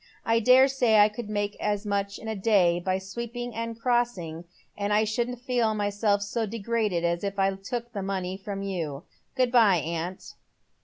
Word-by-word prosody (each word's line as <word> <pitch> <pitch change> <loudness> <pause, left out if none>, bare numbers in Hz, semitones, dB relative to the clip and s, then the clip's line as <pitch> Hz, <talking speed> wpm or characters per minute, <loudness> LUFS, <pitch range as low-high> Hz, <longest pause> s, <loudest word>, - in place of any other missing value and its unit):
" - - -34
I - - +4
dare 255 +4 +6
say 245 -5 +3
I 210 0 +7
could 215 0 -7
make 205 -1 -2
as 210 0 -1
much 200 -1 -1
in 220 - -9
a 220 - -2
day 190 -4 +3
by 185 +1 0
sweeping 235 +5 -6
a 230 +1 -4
crossing, 230 -9 -1 0.3
and 205 0 -2
I 210 +1 +4
shouldn't 240 +3 -2
feel 245 -4 +1
myself 205 0 +1
so 220 +2 -2
degraded 215 -4 -1
as 170 +1 0
if 200 0 -3
I 195 0 +2
took 235 +5 -6
the 200 - -3
money 190 -1 -3
from 195 0 -6
you. 165 -7 -4 0.3
Good 255 -2 +2
bye, 220 -7 +5
aunt." 170 +3 -4
205 Hz, 190 wpm, -27 LUFS, 195-230 Hz, 0.3 s, I